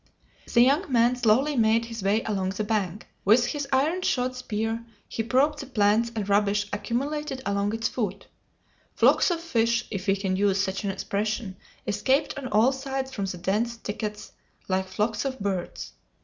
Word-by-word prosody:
The 235 - +5
young 280 +7 +3
man 240 0 +4
slowly 250 +5 +3
made 225 -1 +3
his 230 -1 -7
way 200 +3 +1
along 195 -3 -1
the 215 - 0
bank. 205 -2 -2 0.2
With 225 +5 +5
his 285 +3 -3
iron 300 +7 +2
shod 255 -6 0
spear 225 -1 -3 0.2
he - - -3
probed 270 +6 +2
the 275 - -6
plants 225 -1 +2
and 210 -3 -2
rubbish 205 0 +2
accumulated 265 +6 -2
along 200 +1 0
its 225 0 0
foot. 215 -7 -3 0.7
Flocks - - +4
of 345 -2 0
fish, 235 -8 +1
if 200 -1 -4
we 195 - +4
can 195 -1 -1
use 195 0 +2
such 195 +1 -1
an 200 - -1
expression, 205 +1 -2 0.3
escaped 260 +8 +1
on 275 -2 -5
all 230 +3 +4
sides 265 0 -4
from 200 - -2
the 185 -2 -4
dense 210 +7 0
thickets 210 -1 -5 0.4
like 190 0 0
flocks 210 +2 -1
of 265 -1 -3
birds. 195 -3 -3
225 Hz, 175 wpm, -26 LUFS, 205-255 Hz, 0.7 s, The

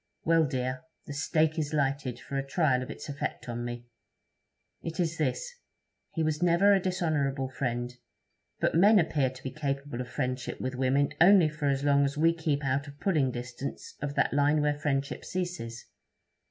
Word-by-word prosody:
Well, 165 -1 +4
dear, 130 -1 -2 0.2
the 145 - -6
stake 155 +2 +1
is 150 -1 -2
lighted 135 -3 -1
for 140 - -7
a 135 - 0
trial 135 -2 +1
of 130 - -6
its - - -7
effect 145 -2 -4
on 120 0 -4
me. 120 0 -5 1.0
It 165 +2 -6
is 160 -2 0
this: - - -1 0.6
he 165 - +1
was 155 0 -1
never 175 +4 +5
a 195 - +4
dishonourable 145 -7 0
friend; 125 -1 -3 0.7
but - - +1
men 205 +6 +6
appear 155 -7 +2
to 130 0 -13
be 130 - -4
capable 140 -3 -3
of 125 - -5
friendship 125 0 -3
with 130 0 -3
women 135 +3 +1
only 180 -2 +7
for 150 -1 -3
as 135 0 0
long 140 -1 +4
as 140 +1 -1
we 165 +2 +4
keep 150 -3 -1
out 135 +2 0
of 145 0 -12
pulling 155 -9 +2
distance 125 +2 -6
of 145 0 -3
that - - +2
line 145 +2 +3
where 150 0 +2
friendship 140 -1 -2
ceases. 175 -11 -4
145 Hz, 180 wpm, -29 LUFS, 130-160 Hz, 1.0 s, only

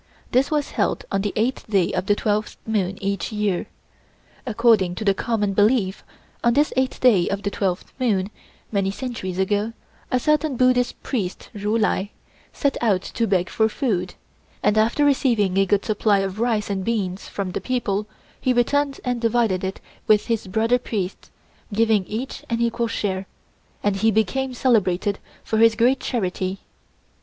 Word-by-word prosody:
This 255 +2 +3
was 300 -2 -1
held - - -1
on 195 - +1
the 205 0 -1
8th 235 +5 -1
day 195 -5 +2
of 185 +1 -2
the 205 - +4
twelfth 210 0 -1
moon 195 -4 -1
each 200 +2 -2
year. 210 -4 -1 0.8
According 220 -6 +3
to 215 - -5
the 200 - +4
common 205 0 -1
belief, 205 -1 +2 0.4
on 235 - +4
this 295 +1 +3
eighth 260 0 0
day 210 -9 +4
of 200 +1 -3
the 200 - -1
twelfth 185 -3 -2
moon, 210 -6 +1 0.4
many 195 -2 +1
centuries 200 -5 -4
ago, 205 +3 0 0.4
a 255 - +3
certain 300 +1 +1
Buddhist 250 0 +2
priest 200 -9 -3
Ju 210 +2 0
Lai 205 -2 +1 0.4
set 280 -1 0
out 200 -6 +2
to 230 - -2
beg 185 -3 +1
for 220 0 +1
food, 195 -8 -1 0.5
and 210 +1 +3
after 230 +7 +3
receiving 235 -9 +2
a 195 - +3
good 200 +1 +2
supply 210 -1 +2
of 195 +1 -4
rice 225 -3 0
and 190 -1 -2
beans 195 -4 -2
from 195 -2 -3
the - - -3
people, 215 -5 -1 0.3
he 255 - +1
returned 275 +3 +1
and 245 -1 -1
divided 225 -5 +1
it 190 0 -3 0.3
with 210 -1 +4
his 225 -4 -1
brother 225 +5 +2
priests, 200 -6 -4 0.4
giving 215 -2 +2
each 240 +5 -5
an 230 0 0
equal 235 0 0
share, 195 -3 -2 0.6
and 205 -1 +1
he 220 +3 +3
became 245 +5 0
celebrated 205 -6 +1 0.2
for 220 - -1
his 225 0 +6
great 245 +4 +3
charity. 190 -4 -2
215 Hz, 170 wpm, -23 LUFS, 195-240 Hz, 0.8 s, his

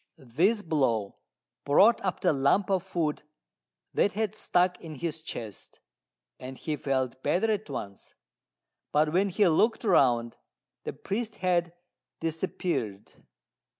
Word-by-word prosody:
This 175 - +1
blow 120 -11 0 0.5
brought 195 +11 +5
up 185 -2 -2
the - - +3
lump 140 +9 +2
of 190 -2 +2
food 170 -5 -2 0.7
that 200 - +2
had 215 0 -1
stuck 180 -4 +1
in 160 -2 -7
his 160 +2 -3
chest, 110 - -8 0.6
and 130 +1 -8
he 155 - -3
felt 130 -3 -2
better 220 +10 +1
at 210 -7 -2
once; 100 -7 -7 0.8
but 150 +1 +2
when 195 +3 +3
he 195 +2 +3
looked 215 +10 +2
round 120 - +3 0.5
the - - -3
priest 220 +2 -4
had 175 -3 0 0.5
disappeared. 165 - -3
165 Hz, 125 wpm, -28 LUFS, 135-190 Hz, 0.8 s, brought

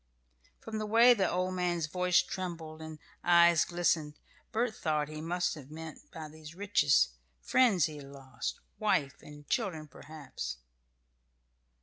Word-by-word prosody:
From 220 -1 -5
the 215 - -3
way 230 +3 +7
the 200 -5 +1
old 185 +1 -1
man's 175 -3 0
voice 180 +3 +2
trembled 165 -4 -6
and 160 -1 -8 0.3
eyes 170 -1 +6
glistened, 165 -4 0 0.4
Bert 230 0 0
thought 150 -2 -1
he 155 0 -7
must 175 +2 -1
have 145 -4 -11
meant 160 0 -9
by 160 -1 -7
these 155 +1 -12
riches 185 - +3 0.3
friends 200 - +3
he 155 -2 -5
had 140 -1 -10
lost 135 -1 -6 0.2
wife 155 -10 0
and 145 -1 -13
children, 180 -10 -2
perhaps. 150 - -7
165 Hz, 140 wpm, -31 LUFS, 150-185 Hz, 0.4 s, way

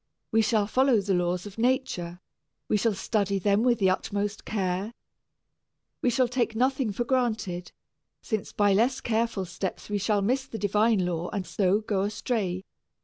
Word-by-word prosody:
We 225 - +4
shall 215 -1 +2
follow 255 +2 +3
the 200 0 0
laws 180 +1 0
of 205 +1 -9
nature. 240 -9 0 0.5
We - - +1
shall 210 0 +1
study 200 0 0
them 200 +2 +2
with 240 -1 +3
the 190 -3 +3
utmost 200 +2 -2
care. 195 +2 -2 1.1
We 250 - +3
shall 250 +1 +2
take 240 -2 -1
nothing 260 -1 +1
for 220 +5 -1
granted, 225 -8 -1 0.5
since 220 -4 -3
by 205 -1 +3
less 245 +6 +2
careful 225 -4 -1
steps 185 +3 -5
we 205 - 0
shall 200 0 +1
miss 260 +5 0
the 225 - -6
divine 210 0 +2
law 175 -1 -2
and 200 -4 -3
so 200 +2 +1
go 205 -3 -1
astray. 200 -3 -2
210 Hz, 165 wpm, -27 LUFS, 190-235 Hz, 1.1 s, We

